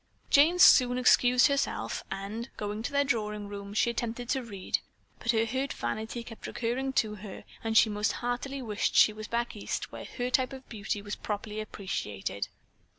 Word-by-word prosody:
Jane 310 +5 +6
soon 250 -7 +7
excused 250 0 +5
herself, 280 0 0
and 210 +5 -5
going 210 +1 -3
to 245 - -3
their 280 0 +3
drawing 210 -6 -1
room, 200 0 -7
she 235 - +3
attempted 235 +1 -4
to 265 - +1
read, 205 -6 -2 0.4
but 230 - -7
her 225 -1 +4
hurt 260 +4 -2
vanity 220 - -4
kept 225 -1 -9
recurring 250 +3 -2
to 215 -4 +1
her 205 -1 -9 0.2
and 225 -1 +2
she - - +7
most 210 0 0
heartily 255 +3 -3
wished 210 -3 -1
she 215 - +7
was 215 0 -7
back 235 0 -2
East, 205 - -4
where - - -7
her 250 0 -1
type 260 +1 +2
of 265 -1 -10
beauty 210 -2 -4
was 205 0 -4
properly 210 0 -4
appreciated. 105 - -4
225 Hz, 180 wpm, -29 LUFS, 210-250 Hz, 0.4 s, soon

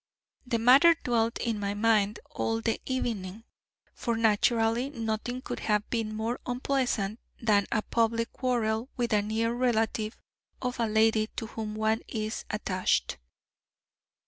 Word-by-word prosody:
The 235 - +1
matter 270 +9 +7
dwelt 230 -2 +1
in 230 -3 -2
my 200 0 -2
mind 210 -1 +2
all 225 -6 -1
the 225 0 -1
evening, 225 -5 -3 0.5
for 235 -1 -2
naturally 225 +3 +2
nothing 235 0 -3
could - - -5
have 210 -1 0
been 220 -2 -1
more 225 +3 -2
unpleasant 245 -4 -1 0.2
than 210 -3 +2
a 215 - +1
public 230 0 0
quarrel 235 -2 0
with 240 -3 0
a 210 - +4
near 220 +2 0
relative 225 -3 0 0.4
of 250 -1 -3
a 230 - +2
lady 220 0 +3
to - - -3
whom 220 -1 -5
one 220 +1 +1
is 215 -1 -4
attached." 185 - 0
225 Hz, 140 wpm, -28 LUFS, 215-240 Hz, 0.5 s, matter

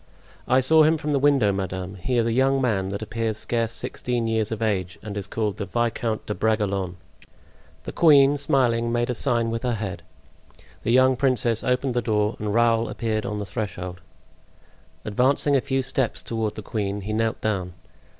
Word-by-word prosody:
"I 130 +1 +4
saw 160 +5 +5
him 155 +1 +4
from 150 0 -3
the 140 - +2
window, 135 -7 +3
madame; 95 -1 -4
he 110 +6 -2
is 115 - +2
a 115 - 0
young 135 +2 +3
man 105 -7 0
that 100 +2 -4
appears 110 0 -2
scarce 115 0 -1
sixteen 120 0 -3
years 110 -1 0
of 110 - -3
age, 95 -5 -1
and 105 -2 -6
is 100 -2 -4
called 105 -1 -2
the 100 - -3
Viscount 115 +1 -1
de 105 - -3
Bragelonne." 100 -5 -1 0.9
The - - -6
queen, 145 -3 +5
smiling, 120 -4 +1
made 120 +1 0
a - - -1
sign 115 0 +1
with 115 0 -3
her 125 -2 -1
head; 95 -5 -5 0.8
the - - -3
young 130 +1 +5
princess 120 -4 +1
opened 125 +1 0
the 120 - +1
door 105 -1 0
and 105 -1 -2
Raoul 115 0 +2
appeared 110 -2 -2
on 105 - -3
the 105 - -4
threshold. 90 -4 -5 1.0
Advancing 130 +6 +2
a 135 - +3
few 135 +1 -1
steps 130 -2 -1
toward 110 -2 -3
the 110 - -7
queen, 100 -1 -3
he 105 +2 -4
knelt 115 +1 0
down. 95 -5 -2
115 Hz, 190 wpm, -24 LUFS, 105-125 Hz, 1.0 s, saw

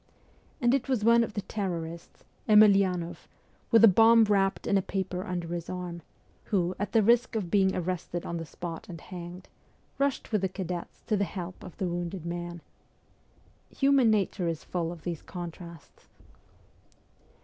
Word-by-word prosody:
And 240 -2 +3
it 270 -1 0
was 250 -6 +1
one 235 0 +6
of 225 - -6
the 205 - -2
terrorists, 170 -5 -5 0.3
Emelianoff, 195 -5 +4 0.4
with 230 -1 +5
a - - +11
bomb 225 +3 +6
wrapped 195 -2 +1
in - - +1
a 195 - +4
paper 185 -1 -3
under 175 -3 -4
his 170 -1 -4
arm, 180 -2 -5 0.4
who, 180 -4 +1
N - - -7
at 205 -1 -3
the 225 -2 +5
risk 235 +3 +3
of 190 -6 -2
being 190 -2 +3
arrested 175 -1 -3
on 170 - -3
the 165 - -5
spot 165 0 -7
and 170 -2 -7
hanged, 180 +1 -9 0.5
rushed 280 -3 -1
with 210 -3 +1
the 190 - 0
cadets 180 -2 -6
to 215 - +1
the 200 - +1
help 180 -1 -6
of 185 - -11
the 190 - -1
wounded 175 0 -4
man. 175 0 -5 1.1
Human 275 -4 +3
nature 195 -4 +1
is 165 -2 -3
full 170 -2 -3
of 170 -3 -10
these 170 -3 -4
contrasts. 170 -2 -10
185 Hz, 170 wpm, -28 LUFS, 175-210 Hz, 1.1 s, a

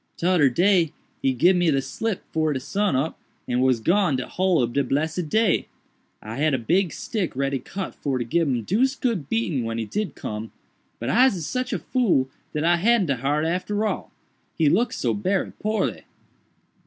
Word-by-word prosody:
Todder 170 -5 +3
day 175 +3 +3 0.3
he 135 - +2
gib 170 +9 +4
me 160 -6 +3
slip 185 +10 -3
'fore 155 -1 +1
de 130 - -2
sun 200 +5 0
up 140 +5 -1 0.3
and 125 0 +1
was 130 -2 +3
gone 175 - +2
de 125 - -2
whole 185 -1 +1
ob 120 -2 0
de 140 - +2
blessed 155 +5 -1
day. 220 +4 +2 0.6
I 110 +3 -6
had 150 -1 +2
a - - 0
big 170 - +1
stick 200 - -3
ready 135 0 0
cut 190 +8 -6
for 135 -3 -2
to 120 - -1
gib 165 +7 +1
him 125 -4 0
deuced 260 - +1
good 215 - -1
beating 175 - 0
when 115 0 -3
he 115 - -2
did 210 - -3
come—but 110 +2 -8
Ise 235 - +3
sich 255 +9 -2
a - - 0
fool 180 - +1 0.2
dat 150 - -2
I 170 +1 +4
hadn't 220 +3 +3
de 135 - +1
heart 145 +5 0
arter 195 +5 -1
all—he 160 -6 -3
look 230 +10 +2
so - - -1
berry 195 -1 -1
poorly." 215 +1 -1
165 Hz, 185 wpm, -24 LUFS, 135-200 Hz, 0.6 s, gib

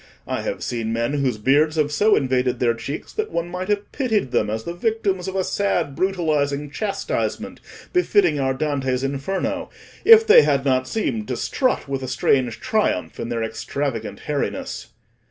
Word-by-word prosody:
I - - -2
have - - -4
seen 115 -2 -2
men 115 +4 -1
whose 135 -6 0
beards 145 +8 +3
have 150 -2 +1
so 210 +8 +4
invaded 125 -1 +1
their 120 -2 +2
cheeks, 140 +6 -6
that 435 0 -2
one 170 +1 -2
might 180 +1 -4
have 205 -1 -1
pitied 220 - 0
them 105 - +1
as 110 +1 -3
the 170 - -5
victims 195 -2 -1
of 190 - -4
a 190 - +1
sad, 180 -8 -1
brutalising 150 -6 0
chastisement 200 +6 -3 0.3
befitting 360 - +3
our 130 -1 0
Dante's 135 -3 -1
Inferno, 140 +8 -2 0.3
if 450 0 +8
they 460 +2 +8
had 140 - +1
not 130 -1 +2
seemed 125 - -2
to 125 -2 -3
strut 255 - 0
with 135 -1 -3
a 130 - -4
strange 130 -1 +1
triumph 90 - -1
in 115 - -4
their 115 -1 -1
extravagant 115 +2 -4
hairiness." - - -3
145 Hz, 170 wpm, -22 LUFS, 130-195 Hz, 0.3 s, if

